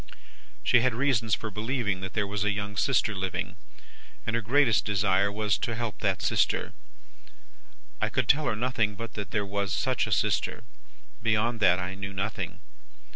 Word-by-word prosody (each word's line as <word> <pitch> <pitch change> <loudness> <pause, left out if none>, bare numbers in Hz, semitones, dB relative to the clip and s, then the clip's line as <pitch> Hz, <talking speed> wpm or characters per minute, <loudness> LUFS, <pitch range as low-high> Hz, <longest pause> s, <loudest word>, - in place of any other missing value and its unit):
"She 120 - +5
had 125 -1 +2
reasons 120 -4 +2
for 110 - -6
believing 105 -3 -1
that 95 - -5
there 105 -2 +1
was 100 0 -2
a 105 - +2
young 100 0 -3
sister 120 -2 +2
living, 95 -2 -3 0.7
and 115 - -1
her 115 - +1
greatest 120 +1 +3
desire 100 0 +2
was, 105 -1 0
to 120 - -2
help 115 -2 -4
that 95 -2 0
sister. - - +1 1.3
I - - +2
could 130 -3 0
tell 150 +2 +4
her - - +1
nothing 110 -3 0
but 115 +1 -7
that 100 -2 -5
there 105 -1 -1
was 100 -1 -2
such 130 +3 0
a - - -5
sister; - - +1 0.6
beyond 115 +1 +1
that, 90 -4 +5
I 90 0 -3
knew 100 0 -6
nothing. 95 +2 -3
105 Hz, 175 wpm, -28 LUFS, 100-115 Hz, 1.3 s, She